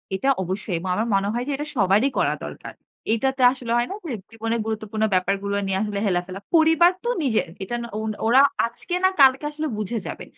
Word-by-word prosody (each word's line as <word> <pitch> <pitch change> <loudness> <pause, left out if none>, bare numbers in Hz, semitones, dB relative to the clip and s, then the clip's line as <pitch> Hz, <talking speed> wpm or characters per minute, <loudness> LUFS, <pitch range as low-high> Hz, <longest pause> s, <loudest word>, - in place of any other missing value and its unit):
এটা 270 - -2
অবশ্যই 190 0 -3
এবং 185 +1 -5
আমার 225 +2 -1
মনে 195 +1 +1
হয় 240 +1 -1
যে - - -1
এটা 295 +2 -5
সবারই 205 +5 +3
করা - - +2
দরকার। - - -8 0.4
এইটাতে 265 +3 0
আসলে 250 -3 -6
হয় 240 - +1
না - - -3
যে 275 - -3 0.2
জীবনের 225 +1 -2
গুরুত্বপূর্ণ 220 0 -3
ব্যাপারগুলো 195 +2 0
নিয়ে 190 0 -1
আসলে 205 -1 -3
হেলাফেলা 185 0 -1 0.2
পরিবার 325 +2 +5
তো 480 - -1
নিজের। 220 -9 +1 0.2
এটা 240 +5 -4 0.3
ওন 220 0 -2 0.2
ওরা 260 +4 +6 0.2
আজকে 235 +9 -5
না 375 - +6
কালকে 265 +1 +6
আসলে 310 +1 -3
বুঝে 215 +2 -3
যাবে। - - -6
225 Hz, 195 wpm, -23 LUFS, 200-265 Hz, 0.4 s, ওরা